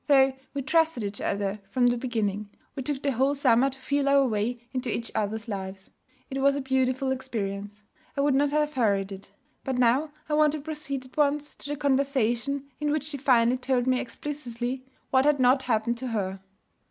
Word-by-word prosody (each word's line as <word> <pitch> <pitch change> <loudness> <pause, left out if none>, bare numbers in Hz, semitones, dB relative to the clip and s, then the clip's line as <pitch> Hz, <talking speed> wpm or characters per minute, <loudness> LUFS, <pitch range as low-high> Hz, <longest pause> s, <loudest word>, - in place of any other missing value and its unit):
Though 270 -2 +5 0.2
we 280 - -2
trusted 320 -4 +2
each 200 0 -4
other 200 +1 -1
from 250 +3 +2
the 245 0 +4
beginning, 215 -4 -2 0.3
we 275 - -3
took 275 +1 -3
the 280 - +2
whole 270 +3 +2
summer 265 -1 +4
to 265 0 -10
feel 280 +1 0
our 280 -1 +5
way 235 +2 -2
into 255 -2 -2
each 230 +1 -3
other's 215 +2 -2
lives. 190 -2 -6 0.4
It 270 0 -2
was 280 0 +4
a 285 - -1
beautiful 265 0 +1
experience. 205 -5 -4 0.3
I - - +2
would 285 0 +3
not 285 +2 +3
have 300 +1 +1
hurried 200 -6 +1
it. 195 0 -9 0.3
But 265 -2 -2
now 250 +5 +3 0.2
I 300 - -2
want 300 -1 +4
to 310 - -3
proceed 280 -3 -5
at 255 - -18
once 295 0 +1
to 285 - -7
the 290 - -1
conversation 275 -2 +1 0.2
in 300 0 0
which 300 -1 0
she 295 -1 -5
finally 250 -2 +4
told 250 -1 0
me 255 -1 +2
explicitly 250 -1 -4 0.3
what 260 0 +5
had 295 -1 +3
not 255 +1 +5
happened 235 -1 0
to 260 - -4
her. 195 -5 -2
260 Hz, 200 wpm, -27 LUFS, 230-280 Hz, 0.4 s, Though